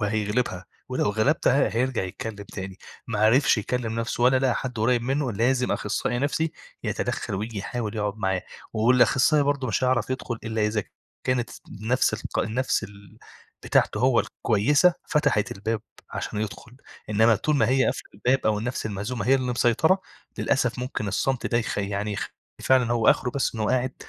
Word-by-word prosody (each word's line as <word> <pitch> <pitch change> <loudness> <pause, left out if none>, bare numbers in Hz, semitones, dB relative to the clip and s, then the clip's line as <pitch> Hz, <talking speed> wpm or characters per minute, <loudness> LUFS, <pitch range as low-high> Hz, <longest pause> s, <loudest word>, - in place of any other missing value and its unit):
وهيغلبها، 105 -2 -1 0.2
ولو 130 -5 0
غلبتها 125 - +2
هيرجع 130 -2 +1
يتكلم 105 +4 -5 0.2
تاني، 95 -1 -6 0.3
ما 110 -2 -2
عرفش 115 +3 +4
يكلم 115 +1 -2
نَفسه 120 +1 -2
ولا 130 +1 +5
لقي 130 -3 +2
حد 125 -3 -4
قريب 120 +2 +2
منه 135 0 0
لازم 125 +4 +1
أخصائي 120 - -1
نَفسي 155 +3 0 0.3
يتدخل - - -2
وييجي 105 +2 -4
يحاول 110 +1 -4
يقعد 105 -1 -2
معاه، 95 -3 -1 0.3
والأخصائي 125 +6 +4
برضو 140 -2 0
مش 120 +4 0
هيعرف 125 -2 +1
يدخل 130 -3 -3
إلا 110 -1 0
إذا 105 -1 -1 0.4
كانت 125 -2 0 0.3
نَفس 125 +4 +2
الق - - -5
النَفس 115 0 0
ال 100 -1 -14 0.5
بتاعته - - +2
هو 125 -2 +4
الكويسة 145 - +2
فتحت 145 -9 +1
الباب 105 +2 -3 0.3
عشان 105 - -4
يدخل، 115 +3 -6 0.3
إنما 110 +2 +5
طول 150 +7 0
ما 115 -3 +3
هي 130 0 +3
قافلة - - -2
الباب 125 +6 +1
أو 105 -1 +2
النَفس 120 0 -3
المهزومة 110 +4 -4
هي 135 - +5
اللي 125 -1 -1
مسيطرة، 140 - +3 0.4
للأسف 125 -3 +1
ممكن 125 -4 -3
الصمت 130 +5 0
ده 120 - +1
يخ 115 - -2
يعني 100 +1 -2
يخ - - -3 0.3
فعلًا 125 -3 +3
هو 115 -2 +2
آخره 125 - +1
بس 135 -3 -1
إن 110 - -5
هو 105 - +1
قاعد 130 0 0
120 Hz, 170 wpm, -25 LUFS, 105-130 Hz, 0.5 s, ولا